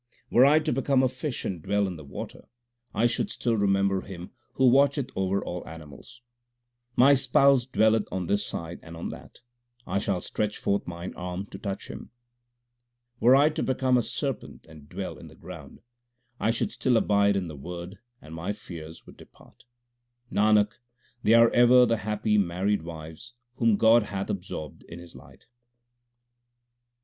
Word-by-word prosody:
Were 130 +3 +6
I 150 +2 +5
to 155 -1 0
become 135 +1 +2
a - - +4
fish 130 +1 -5
and 90 -4 -4
dwell 100 +4 0
in 95 -2 -4
the 80 - -10
water, 70 - -9 0.4
I 115 - +1
should 120 0 0
still 120 -2 -1
remember 100 -2 +1
Him 90 -2 -9 0.2
who 130 - +3
watcheth 140 +1 +3
over 95 +1 -1
all 90 0 -4
animals. 80 - -12 0.7
My 135 +3 +6
Spouse 135 -1 +4
dwelleth 110 -3 +2
on 95 -1 -3
this 100 +4 0
side 85 +1 -5
and 85 0 -11
on 85 - -5
that; - - -11 0.4
I 100 - -1
shall 100 -2 -1
stretch 105 +3 -3
forth 100 0 -1
mine 85 +1 -6
arm 90 +2 -5
to - - -8
touch 100 -2 -5
Him. - - -9 1.1
Were 125 +3 +6
I 145 +3 +5
to 155 - -4
become 130 0 +1
a 125 - +4
serpent - - -5
and 75 -3 -15
dwell - - -6
in - - -11
the - - -15
ground, 80 -7 -11 0.6
I - - +1
should 115 - 0
still 130 - +1
abide 100 -2 +3
in 95 -3 -1
the 80 - -8
Word 90 +6 -8 0.2
and 80 - -11
my 85 +5 -3
fears 80 -6 -10
would - - -15
depart. - - -19 0.7
Nanak, 105 0 +3 0.4
they 110 +1 +4
are 115 0 +6
ever 125 +1 +6
the 115 -1 +1
happy 105 0 0
married 95 +2 0
wives 80 +8 -9 0.2
whom 115 -4 +3
God 115 +2 +6
hath 100 -2 -4
absorbed 90 -6 -6
in 85 - -10
His 85 -1 -13
light. - - -16
100 Hz, 170 wpm, -26 LUFS, 90-120 Hz, 1.1 s, Were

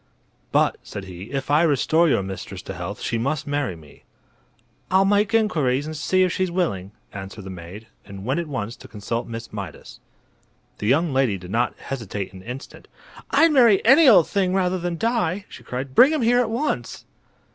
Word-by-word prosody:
"But," - - +2
said 100 - -8
he, 90 0 -9
"if 135 +4 -4
I 150 +2 +5
restore 160 +2 +3
your 100 - +2
mistress 95 0 -7
to - - -6
health - - -6
she 115 - -1
must 140 +5 -1
marry 145 -9 -2
me." 75 -3 -17 0.9
"I'll 190 +2 +4
make 205 +1 +2
inquiries 145 - +1
and 155 0 -6
see 185 +5 +2
if 180 - +1
she's 185 -1 0
willing," 130 - -2 0.2
answered 100 +1 -8
the 95 - -8
maid, 90 +4 -9 0.2
and 100 -1 -10
went 135 +7 0
at 170 - -4
once 120 -5 -4
to - - -13
consult 115 +3 -4
Miss 115 -1 -8
Mydas. 100 -7 -8 0.8
The 105 - -3
young 145 +5 +2
lady 130 -7 +2
did 90 0 -10
not 120 +3 0
hesitate 105 -8 -5
an 95 - -11
instant. 125 +6 -9 0.4
"I'd 325 0 +4
marry 235 -9 +5
any 270 +6 +7
old 190 -8 +6
thing 190 -2 0
rather 185 -1 +1
than 175 -1 -3
die!" 205 -3 0
she - - -12
cried. 130 +1 -5
"Bring 260 - +7
him 310 -5 0
here 245 +2 +4
at 240 -3 +1
once!" 230 - -3
140 Hz, 190 wpm, -23 LUFS, -, 0.9 s, any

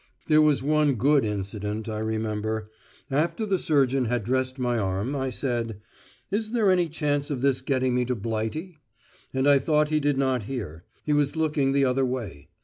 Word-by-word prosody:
There 155 -1 +5
was 150 -5 +3
one 150 -1 +2
good 140 +4 +3
incident 105 +1 -3
I 110 -1 -3
remember. 110 0 -2 0.4
After 165 - 0
the 195 -3 0
surgeon 135 -4 +2
had 120 -1 -1
dressed 130 +3 -1
my 120 -2 0
arm, 100 +7 -1
I 135 -1 -1
said, 120 -4 -2 0.5
"Is 215 +2 -2
there 215 -5 +3
any 175 -2 +2
chance 145 -2 -1
of 135 -4 -3
this 135 -1 +2
getting 130 -2 0
me 125 0 +1
to 125 +1 -1
Blighty?" 115 - -4 0.5
And 130 +1 0
I 140 -1 +6
thought 150 +2 +2
he 155 0 +2
did 145 -2 +1
not 130 -5 0
hear; 95 - -6 0.2
he 150 - +1
was 145 +1 +1
looking 150 -4 +1
the 140 0 +3
other 130 +1 +1
way. 115 - -4
130 Hz, 185 wpm, -26 LUFS, 110-150 Hz, 0.5 s, I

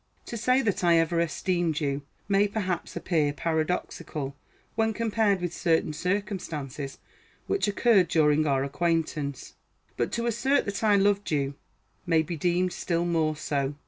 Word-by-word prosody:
To - - -6
say 255 +4 +2
that 205 -4 0
I 170 -1 +5
ever 165 +1 +2
esteemed 170 0 0
you 140 -2 -1 0.3
may, 200 +1 +3
perhaps, 195 -4 -3
appear 155 -5 +1
paradoxical 155 -2 -2 0.4
when 220 0 +1
compared 220 -4 +1
with 175 -1 -2
certain 160 -3 +1
circumstances 165 - -3 0.5
which 395 - 0
occurred 205 -2 +4
during 155 -1 +3
our 135 -1 +2
acquaintance; 150 -1 -2 0.4
but - - 0
to 235 0 -1
assert 245 +5 +2
that 200 +2 -3
I 210 -2 +5
loved 200 0 +2
you 140 -2 0 0.5
may 165 -2 +3
be 170 +2 -4
deemed 180 +3 +1
still 170 -1 -1
more 160 -3 +1
so. 145 -2 -2
170 Hz, 145 wpm, -27 LUFS, 155-200 Hz, 0.5 s, I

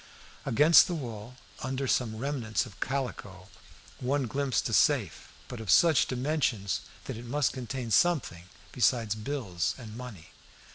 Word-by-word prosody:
Against 150 +8 +6
the 175 - -2
wall, 120 -4 -7 0.3
under 130 +1 -2
some 115 -3 0
remnants 125 -3 -2
of 105 -7 -14
calico, 105 -8 -4 0.5
one 135 +2 0
glimpsed 135 +1 -1
a - - -4
safe, - - +2 0.2
but 125 - -7
of 110 -3 -8
such 160 -6 +5
dimensions 125 -6 -1 0.2
that - - -5
it 120 - -9
must 140 +4 0
contain 125 -2 -5
something 135 - +2 0.3
besides 115 -3 +2
bills 110 -6 -3
and 110 -4 -10
money. 120 -9 -9
125 Hz, 140 wpm, -29 LUFS, 110-140 Hz, 0.5 s, Against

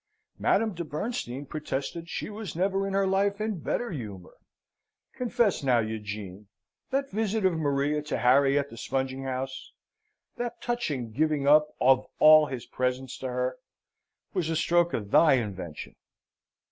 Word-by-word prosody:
Madame 225 -2 +2
de 170 0 -4
Bernstein 150 - -4
protested 155 +3 -4
she - - -4
was 210 -5 -7
never 195 +2 0
in 195 - -3
her 195 0 +3
life 200 +2 +1
in 215 -4 -2
better 240 +9 -2
humour. 105 - -7 0.8
"Confess, 240 -5 +1
now, 130 -3 +3
Eugene, 105 -3 -4 0.4
that 275 +1 -1
visit 215 0 0
of 185 - +4
Maria 145 -1 0
to 150 +1 -3
Harry 135 +3 +4
at 140 0 -1
the 115 - -10
spunging 135 +2 -2
house 130 0 -5 0.6
that 240 -1 -4
touching 150 - -2
giving 150 +2 0
up 150 +1 +6
of 130 0 +4
all 155 0 +8
his 130 -4 -6
presents 130 0 -2
to 130 - -4
her, 125 - -2 0.7
was 180 -5 -1
a 165 - 0
stroke 170 +1 +2
of 105 -2 -5
thy 160 -3 +6
invention?" 95 - -3
150 Hz, 150 wpm, -28 LUFS, 130-195 Hz, 0.8 s, all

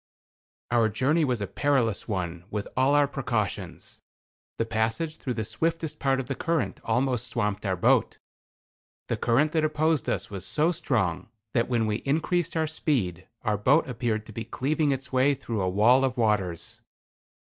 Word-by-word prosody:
Our 115 -2 +4
journey 145 +9 +2
was 125 -6 0
a - - 0
perilous 130 -4 0
one 90 -4 -3
with 105 -1 -3
all 130 +3 +3
our 145 -1 +4
precautions. 120 -7 -3 0.6
The 115 - 0
passage 115 +9 -1
through 125 -3 -4
the 110 -1 -2
swiftest 165 +5 -2
part 135 -1 +1
of 130 - -3
the 135 - -3
current 165 0 -1
almost 125 +1 0
swamped 105 -3 -1
our 95 - +1
boat. 90 - +2 0.9
The - - +1
current 140 +6 +2
that 160 -1 +1
opposed 155 0 +1
us - - -2
was 95 -3 -5
so 155 - +2
strong, 100 - -1 0.2
that 115 +1 +1
when 120 -3 +1
we 105 -1 0
increased 165 +5 0
our 160 - +2
speed 105 - -1 0.2
our 105 -3 0
boat 140 +9 +4
appeared 115 -3 -2
to 110 - -11
be 115 - -4
cleaving 150 +5 0
its 135 0 -3
way 135 +2 +4
through 115 -5 -3
a 95 - +1
wall 115 +8 +4
of 130 -2 0
waters. 100 -7 0
125 Hz, 170 wpm, -27 LUFS, 110-145 Hz, 0.9 s, Our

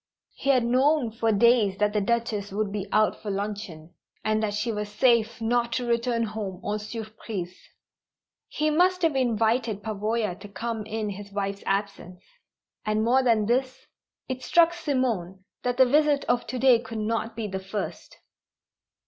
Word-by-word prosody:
_" - - -67 0.3
He 275 - -4
had 255 -3 +4
known 255 +1 +2
for 225 0 0
days 215 -2 +4
that 210 0 +1
the 210 - +1
Duchess 215 -2 -1
would 205 0 -1
be 205 -1 -4
out 215 0 +2
for 210 - -5
luncheon, 195 -5 -5 0.3
and 215 0 +1
that 205 -2 -1
she 220 +3 -1
was 210 -1 -4
safe 230 +1 +2
not 235 +1 0
to 250 0 -1
return 235 0 +1
home 210 -4 -4
en 210 +1 -1
surprise. 215 -4 -6 0.9
He 305 0 0
must 360 +3 +3
have 320 -4 +3
invited 230 -3 +1
Pavoya 215 -1 -1
to 205 - -10
come 220 +2 -4
in 215 -1 -3
his 200 +1 -9
wife's 200 0 -3
absence. 195 -2 -3 0.6
And 215 0 0
more 250 +3 +4
than 230 -4 +3
this, 260 +3 -1 0.4
it 260 0 -4
struck 340 +2 +4
Simone 235 - -2 0.2
that 245 0 -1
the 260 - +7
visit 290 +2 +3
of 240 0 0
to 255 - -4
day 250 -2 +5
could 230 -1 -7
not 225 +1 -2
be 225 -1 -3
the 190 -2 -4
first. 190 +2 -6
225 Hz, 170 wpm, -26 LUFS, 205-245 Hz, 0.9 s, the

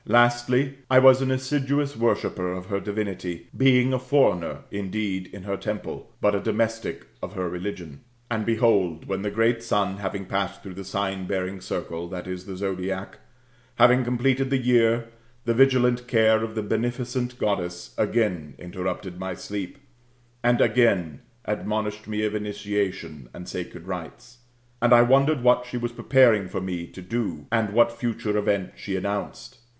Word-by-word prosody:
Lastly, 120 +3 +3
I 130 - +6
was 130 0 +8
an 135 - 0
assiduous 140 +2 0
worshipper 95 -5 0
of 90 0 -6
her 100 +1 -2
divinity, 95 -5 -4
being 130 -1 +4
a 130 - +1
foreigner 130 - +2
indeed 100 -1 -3
in 100 - -10
her 100 0 -3
temple, 105 +1 -5
but 105 - +3
a 100 - +1
domestic 115 +1 -1 0.2
of 90 - -6
her 95 -3 -2
religion.'* 90 -4 -6 0.3
And 110 -2 -1
behold, 105 -8 +2
when 95 0 -2
the 105 - -1
great 115 +2 +2
Sun 100 -4 0
having 100 0 -4
passed 100 +1 -3
through 95 - -8
the 95 +2 -7
sign 95 -1 -3
bearing 95 0 -3
circle 85 -1 -4
[ie. 90 0 -5
the 90 +1 -8
sodiac], 95 0 -4 0.6
had 125 +2 +6
completed 130 +2 +1
the 135 - +2
year, 120 -2 +3 0.4
the 115 - +2
vigilant 125 -1 +3
care 110 -2 +4
of 110 0 -5
the 110 - -1
t)eneficent 120 +3 -2
Goddess 90 -5 -2
again 105 - 0
interrupted 90 0 -5
my 95 -1 -4
sleep, 100 -1 -6 0.7
and 120 0 +3
again 95 - +2 0.2
admonished 105 0 -2
me 105 0 -2
of 105 - -1
initiation 105 - -3
and 90 - -9
sacred 90 -1 -6
rites, 95 +6 -8 0.4
^d 120 0 +3
I 120 0 +8
wondered 135 +2 +3
what 125 0 +4
she 125 - -4
was 120 0 -2
preparing 120 -5 +4
for 90 - -4
me 90 -2 -4
to 95 - -11
do, 90 -8 -3
and 110 -3 +1
what 120 +2 +4
future 115 -3 -2
event 100 -2 0
she 95 - -4
announced. 100 +6 -4
105 Hz, 160 wpm, -25 LUFS, 95-120 Hz, 0.7 s, was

